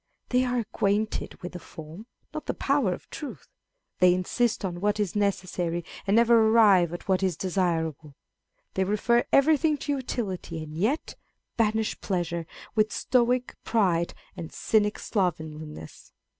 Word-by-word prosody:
They 250 0 +3
are 250 0 0
acquainted 215 -1 -1
with 180 - -5
the 180 - -7
form, 165 +7 -11 0.3
not 310 - -6
the - - -1
power 275 -8 +1
of 180 - -6
truth; 295 - -7 0.5
they 180 -1 +6
insist 210 +4 0
on 175 -2 -4
what 210 +1 +1
is 205 -3 -1
necessary, 180 -4 -1 0.2
and 200 - +3
never 235 0 +6
arrive 205 -7 +5
at 175 - -7
what 190 -1 +2
is 185 -4 0
desirable. 165 -6 -1 0.6
They 190 - +1
refer 210 +5 +2
everything 305 +2 +4
to 290 - -3
utility, 190 - -4
and 155 0 -9
yet 220 - 0 0.4
banish 220 -1 0
pleasure 170 -3 -2 0.3
with 215 -1 +2
stoic 250 0 +1
pride 180 -7 +1 0.2
and 165 - -7
cynic 210 -1 +1
slovenliness. 155 - -4
200 Hz, 145 wpm, -27 LUFS, 175-230 Hz, 0.6 s, they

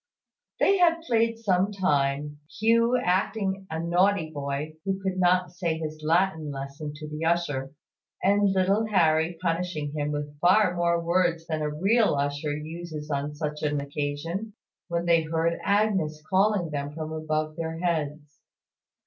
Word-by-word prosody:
They 395 -1 +4
had 335 -2 +4
played 230 -4 +1
some 195 -3 +1
time, 145 -6 0 0.2
Hugh 230 +3 +4
acting 190 -1 0
a 160 - -3
naughty 175 0 +2
boy 145 +1 -4
who 195 -1 -1
could 190 -1 -2
not 180 -1 +3
say 170 -2 -2
his 155 -1 -5
Latin 160 -1 +1
lesson 140 +2 -6
to 150 +1 -8
the 150 +1 -5
usher, 145 -6 0 0.5
and 200 +1 +4
little 195 +3 +2
Harry 165 -4 +2
punishing 165 -4 -2
him 150 0 -2
with 145 0 -5
far 185 +2 +4
more 170 0 +2
words 170 -1 +1
than 160 -2 -2
a 150 - 0
real 195 +7 +2
usher 145 +1 -1
uses 155 -1 -7
on 145 +1 -2
such 150 -1 -4
an 150 -1 0
occasion, 145 +9 -4 0.3
when 170 0 -2
they 170 -1 +4
heard 165 +1 -1
Agnes 200 -7 +1
calling 190 -3 +2
them 145 0 -3
from 160 -1 -5
above 155 0 -2
their 165 -1 -4
heads. 150 -4 -3
165 Hz, 150 wpm, -26 LUFS, 150-190 Hz, 0.5 s, They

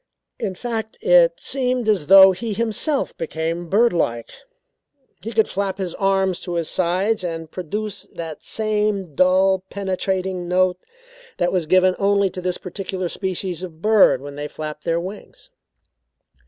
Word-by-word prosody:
In 200 -5 -3
fact 225 0 -4
it - - +6
seemed 250 -3 -1
as 195 -9 +1
though 195 +1 +9
he 215 +4 -4
himself 230 +7 -1
became 165 +1 -3
birdlike. 175 - +1 0.9
He 225 - -5
could 220 -1 +2
flap 195 -1 -2
his 185 -3 -4
arms 195 -2 +1
to 175 -2 -5
his 165 -2 -1
sides 185 +4 0
and 165 -2 -5
produce 205 +3 -5
that 165 -2 -7
same 210 -5 -1
dull 185 +3 +3
penetrating 190 -2 -2
note 180 0 +2 0.6
that 175 - +1
was 180 -4 -1
given 185 +1 +4
only 200 -1 +2
to 180 - -6
this 180 0 -2
particular 185 -1 -5
species 185 -2 -4
of 170 -4 -8
bird 210 -11 +5
when 145 0 -8
they 145 +1 -5
flapped 150 0 -7
their 165 0 +1
wings. 190 +4 -9
185 Hz, 145 wpm, -21 LUFS, 175-210 Hz, 0.9 s, though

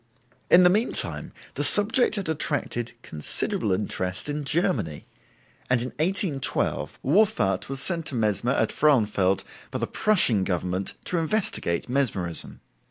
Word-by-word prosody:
In 180 - +7
the 180 - +7
meantime, 215 +5 0 0.2
the - - -2
subject 215 +3 +3
had 200 -3 -3
attracted 145 -6 -3
considerable 80 +6 -1
interest 95 +3 -2
in 145 0 -3
Germany, 150 - -1 0.6
and 125 -1 +3
in 125 +2 -2
1812 170 -4 0
Wolfart 130 - +2
was 135 -1 -2
sent 165 +1 0
to 135 - -3
Mesmer 115 +2 +1
at - - +1
Frauenfeld 105 -10 +2 0.3
by - - -4
the - - -1
Prussian 150 - +3
government 90 +1 -2
to 175 - 0
investigate 160 - 0
Mesmerism. 110 -11 -1
135 Hz, 130 wpm, -25 LUFS, -, 0.6 s, In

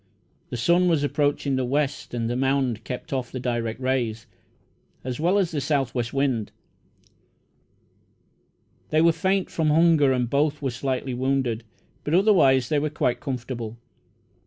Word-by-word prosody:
The 120 - -4
sun 175 +9 +3
was 160 -4 +2
approaching 145 -1 0
the 130 - 0
west, 140 0 -2
and 115 -1 -1
the 120 - -2
mound 130 -3 0
kept 125 +6 -6
off 130 -2 -2
the 130 - -5
direct 120 -2 -2
rays, 125 -4 -1 0.8
as 130 +1 -4
well 175 +5 +2
as 190 -4 +1
the 150 -3 -2
south 135 -3 0
west 120 -2 -2
wind. 135 -6 0 2.4
They 155 - +2
were 165 0 +6
faint 190 +4 0
from 160 -2 0
hunger, 155 -3 +4
and 125 -2 +1
both 145 +3 +1
were 135 -3 -2
slightly 130 +1 -3
wounded, 130 -2 -1 0.4
but 150 - 0
otherwise 140 - +4
they 150 - +2
were 155 +1 -1
quite 125 -4 -1
comfortable. 120 -5 -5
135 Hz, 155 wpm, -24 LUFS, 125-150 Hz, 2.4 s, were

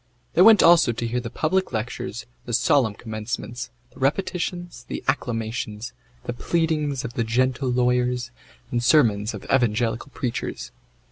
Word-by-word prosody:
They - - +4
went 220 -2 +8
also 165 -8 +6
to 115 - -3
hear 120 +2 -1
the 120 -1 -5
public 185 +9 0
lectures, 120 0 -4 0.2
the 120 - -5
solemn 115 -1 +3
commencements, 115 +2 -5 0.2
the - - -16
repetitions, 175 +4 -2
the - - -5
acclamations, 115 -4 -2 0.3
the 120 - -4
pleadings 150 -1 -1
of 120 - -6
the 115 - 0
gentle 130 +3 0
lawyers, 125 0 +1 0.4
and 120 -1 0
sermons 115 -6 +3
of - - -8
evangelical 120 0 +1
preachers. 115 - -4
125 Hz, 140 wpm, -24 LUFS, 115-140 Hz, 0.4 s, went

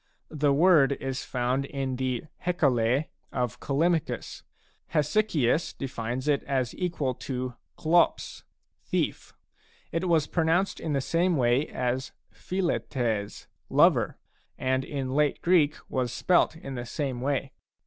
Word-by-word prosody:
The 150 -2 +2
word 145 -2 +5
is 135 -1 -4
found 125 +2 -1
in 135 -2 -3
the 130 -2 -1 0.2
Hecale 140 -6 +2 0.3
of 125 -3 -2
Callimachus. 160 +3 -1 0.5
Hesychius 150 - +1
defines 125 0 -4
it 145 -2 +3
as 130 -3 -1
equal 165 -8 -1
to 125 0 -4 0.2
«Atty 170 +2 +3 0.6
"thief." - - -2 0.6
It 170 +2 -1
was 160 -3 +3
pronounced 170 +4 +1
in 155 - -2
the 140 - +1
same 170 +4 +1
way 125 +3 +2
as 130 +1 -2 0.2
<pi\ - - -32 0.3
qrtis 120 - -1
" - - -27
iover," - - +4 0.4
and 130 0 0
in 135 -2 -4
late 150 0 +2
Greek 165 -4 +4
was 125 -3 -1
spelt 175 +5 +2
in 135 -4 -8
the 120 -2 -5
same 130 -2 -3
way. 135 0 -1
140 Hz, 130 wpm, -27 LUFS, 130-160 Hz, 0.6 s, word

